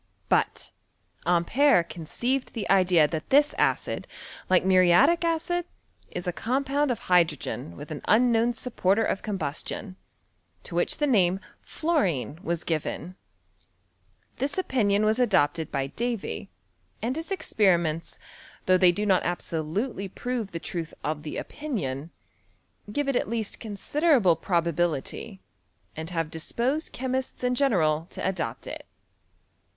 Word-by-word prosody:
But - - +1 0.6
Ampere 180 +5 +4
conceived 240 - -3
the 225 -4 -3
idea 180 -5 +5
that 155 0 -5
this 290 +2 +5
acid, - - 0 0.4
like 185 0 +4
muriatic 190 - +5
acid, 335 +1 0 0.4
is 175 - -5
a 180 - -1
com 255 +9 -1
pound 285 +1 +1
of 245 - -1
hydrogen 160 - +1
with 150 - -9
an 150 - -5
unknown 235 +1 +4
supporter 225 -3 +1
of - - -1
combustion, 190 0 -4 0.7
to - - -10
which - - +1
the 295 - +1
name 190 -8 +3 0.3
^worine 180 - 0
was 170 -4 -2
given. 165 +2 -3 1.2
This 280 +4 -2
opinion 215 - +2
was 215 +3 +2
adopted 160 - +2
by 135 -1 0
Davy, 235 - -3 0.5
and 245 +4 -2
his 325 +4 -5
ex 390 - -4
periments, 170 -6 +2 0.5
though 185 0 +5
they 180 -1 +6
do 205 +4 -2
not 190 -3 +4
absolutely 175 - -2
prove 235 +2 -3
the 170 - -5
truth 165 -1 -5
of 155 -1 -2
the 150 - -6
opinion, 165 - -4 0.8
give 290 +5 -1
it 275 - +1
at - - 0
least 225 -2 -2
considerable 230 - +2
probability, 170 +3 -1 0.5
and 160 +1 -5
have 165 -3 -2
disposed 245 - -1
chemists 260 0 -3
in 250 0 +2
general 170 - +2
to - - -3
adopt 145 -12 -3
it. - - -7
195 Hz, 135 wpm, -26 LUFS, 170-250 Hz, 1.2 s, they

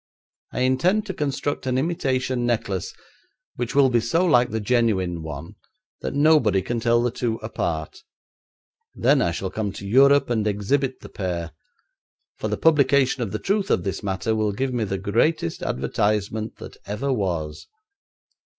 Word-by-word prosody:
I - - -3
intend 170 +12 +2
to 190 - -4
construct 145 -2 -2
an 130 0 +1
imitation 130 -5 0
necklace 110 -6 -1 0.6
which 120 0 -4
will 135 -2 +5
be 120 - +4
so 165 +11 +1
like 125 -8 +4
the 110 - -2
genuine 105 -7 +1
one 80 +3 -7 0.5
that - - -4
nobody 140 - +4
can 120 -1 -2
tell 120 +1 +2
the 120 - +1
two 115 -1 -1
apart; 80 -8 -3 1.0
then - - +3
I - - +2
shall 95 +2 -4
come 105 -2 -2
to 100 - -8
Europe 140 +4 +5
and 110 -2 +1
exhibit 130 +6 0
the - - -10
pair, 85 -4 -4 0.9
for - - -3
the - - -2
publication 140 -4 +3
of 110 -5 -2
the 105 - -2
truth 200 - -1
of - - +2
this 95 - -3
matter 100 +2 -1
will 105 -1 0
give 130 +5 -2
me 115 -3 0
the 95 -1 -2
greatest 110 - 0
advertisement 105 - -1
that - - -11
ever 115 +7 -1
was. 85 -8 -3
115 Hz, 160 wpm, -23 LUFS, 100-135 Hz, 1.0 s, will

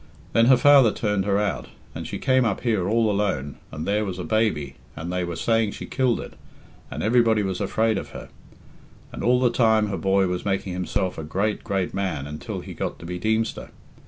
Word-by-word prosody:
Then 115 +1 +5
her 130 -1 +7
father 135 -3 +6
turned 105 -3 -1
her 100 -1 +2
out, 105 -2 -1 0.3
and - - -6
she - - -4
came 130 -1 +2
up 110 -4 -1
here 105 -7 0
all 110 -1 +2
alone, 95 -9 -1
and 75 +2 -5
there 105 +2 +1
was 95 -3 -4
a 90 - -4
baby, 80 -7 0 0.2
and 85 +3 -5
they 90 0 0
were 85 -1 -4
saying 115 0 +1
she - - -7
killed 130 -3 0
it, - - -8 0.6
and - - -5
everybody 115 -1 +3
was 95 0 -3
afraid 110 +1 +1
of - - -8
her. - - -9 0.8
And - - -6
all 125 +1 +4
the 125 -2 +3
time 110 -3 +3
her 100 - -2
boy 95 0 +2
was 90 -1 -2
making 95 -2 -2
himself 90 0 -2
a - - -5
great, 100 +7 -1
great 95 -2 -2
man 90 -8 -2
until 75 +1 -6
he - - -9
got - - -4
to - - -11
be 90 +1 -5
Deemster. 110 +3 -1
100 Hz, 215 wpm, -24 LUFS, 90-115 Hz, 0.8 s, her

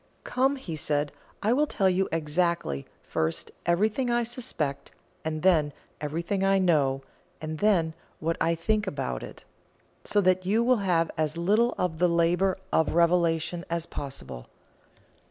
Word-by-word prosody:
"Come," 265 +2 +1
he 185 - -6
said, 145 -1 -1 0.3
"I 220 +3 +3
will 295 +4 +2
tell 195 -8 +1
you 190 +1 +2
exactly, 165 - 0 0.2
first, 80 0 -2 0.2
everything 215 +8 +2
I 240 0 +2
suspect, 225 - -3 0.3
and 155 -1 -3
then 155 -6 +4 0.3
everything 170 +6 -2
I 195 0 +4
know, 145 -7 +2 0.4
and 155 0 -5
then 180 -7 +3 0.3
what 165 +1 0
I 165 +1 +2
think 210 +5 0
about 65 - -3
it, - - -10 0.6
so 205 - +1
that 185 -1 +3
you 210 +5 +2
will 250 +1 +4
have 175 -5 +1
as 155 +1 0
little 210 +8 +2
of 160 -3 -1
the 180 0 +4
labour 170 +3 +2 0.2
of 160 0 +2
revelation 170 -1 +2
as 170 -1 -2
possible. 135 - -7
170 Hz, 150 wpm, -27 LUFS, 155-195 Hz, 0.6 s, then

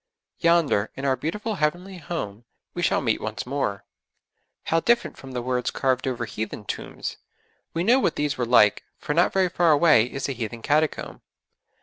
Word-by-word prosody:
Yonder, 165 -11 +3
in 135 - -5
our 135 -1 +3
beautiful 205 - -3
Heavenly 180 +5 -1
Home, 120 -11 -5 0.3
we 175 - -4
shall 165 - +2
meet 115 -5 0
once 110 0 -4
more. 125 -7 -2 0.8
How 165 - +1
different 235 +7 +1
from 135 -1 -11
the 125 -1 -3
words 125 0 -1
carved 130 -1 0
over 120 -2 -2
heathen 110 -1 -5
tombs! - - -5 0.6
We 165 - 0
know 240 +7 +5
what - - +1
these 145 -1 -1
were 120 -3 -2
like, 105 -4 +5
for 150 - -3
not 170 +3 +3
very 190 -1 +2
far 175 -1 +2
away 150 -6 +5
is 135 +2 -4
a - - -2
heathen 115 -1 -6
catacomb. 155 +1 0
140 Hz, 180 wpm, -24 LUFS, 120-170 Hz, 0.8 s, know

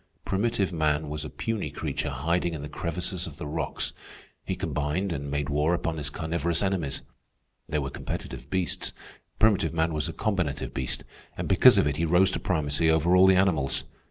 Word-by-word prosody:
Primitive 100 -2 0
man 75 -1 +1
was 75 0 -4
a 75 - -5
puny 115 -2 -3
creature - - -3
hiding 85 0 0
in 75 - -6
the - - -4
crevices 85 +3 -3
of 75 -2 -10
the - - -6
rocks. 75 +3 -3 0.5
He - - -2
combined 75 +7 -1
and 70 -3 -3
made 70 0 -1
war 75 +4 +2
upon 85 -1 -2
his 75 -1 -2
carnivorous 85 +3 -1
enemies. 90 -8 -1 0.6
They 75 - -1
were 70 -2 -2
competitive - - -6
beasts. 95 -5 -2 0.4
Primitive 105 -6 +3
man 80 0 +1
was 75 +2 -1
a - - -5
combinative 95 -7 -1
beast, 65 -1 -3 0.3
and - - -3
because - - +7
of - - +4
it 75 0 0
he 85 - +1
rose 90 +4 +4
to - - -2
primacy 80 -3 +1
over 80 +3 +4
all 95 +1 +7
the 95 - +6
animals. 85 -8 +2
80 Hz, 185 wpm, -27 LUFS, 75-90 Hz, 0.6 s, because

